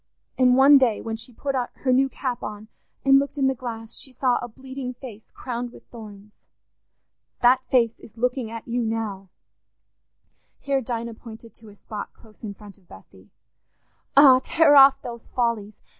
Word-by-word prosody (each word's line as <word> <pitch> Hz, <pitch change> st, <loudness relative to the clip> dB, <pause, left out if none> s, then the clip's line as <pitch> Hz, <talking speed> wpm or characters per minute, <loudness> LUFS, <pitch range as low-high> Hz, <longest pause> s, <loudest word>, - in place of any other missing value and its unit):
And 255 Hz, -1 st, +4 dB
one 275 Hz, +1 st, +7 dB
day 240 Hz, -5 st, +1 dB
when 225 Hz, -1 st, -5 dB
she 225 Hz, +3 st, -9 dB
put 275 Hz, +4 st, -4 dB
her 255 Hz, 0 st, -2 dB
new 270 Hz, +1 st, +3 dB
cap 255 Hz, -2 st, -4 dB
on 210 Hz, +1 st, -8 dB, 0.4 s
and 270 Hz, 0 st, +6 dB
looked 280 Hz, +1 st, -4 dB
in 275 Hz, -, +1 dB
the 265 Hz, -, +2 dB
glass, 230 Hz, -3 st, -8 dB
she 265 Hz, -, -7 dB
saw 250 Hz, 0 st, 0 dB
a -, -, -5 dB
bleeding 260 Hz, +1 st, -8 dB
Face 230 Hz, -5 st, -12 dB
crowned 245 Hz, -1 st, -6 dB
with -, -, -16 dB
thorns. 210 Hz, -3 st, -12 dB, 1.1 s
That 250 Hz, +2 st, +5 dB
face 230 Hz, -3 st, +2 dB
is 225 Hz, -, -16 dB
looking 250 Hz, 0 st, -1 dB
at 230 Hz, 0 st, -8 dB
you 240 Hz, +1 st, -1 dB
now"—here 225 Hz, +5 st, -7 dB
Dinah 235 Hz, -1 st, -5 dB
pointed 225 Hz, 0 st, -13 dB
to 225 Hz, -2 st, -16 dB
a 205 Hz, -, -16 dB
spot 210 Hz, 0 st, -8 dB
close 215 Hz, -2 st, -21 dB
in 205 Hz, -3 st, -7 dB
front 205 Hz, -1 st, -15 dB
of 185 Hz, -, -30 dB
Bessy—"Ah, 255 Hz, -, 0 dB
tear 325 Hz, -3 st, +4 dB
off 275 Hz, 0 st, +7 dB
those 235 Hz, -2 st, -8 dB
follies! 230 Hz, -4 st, -2 dB
240 Hz, 165 wpm, -23 LUFS, 220-265 Hz, 1.1 s, one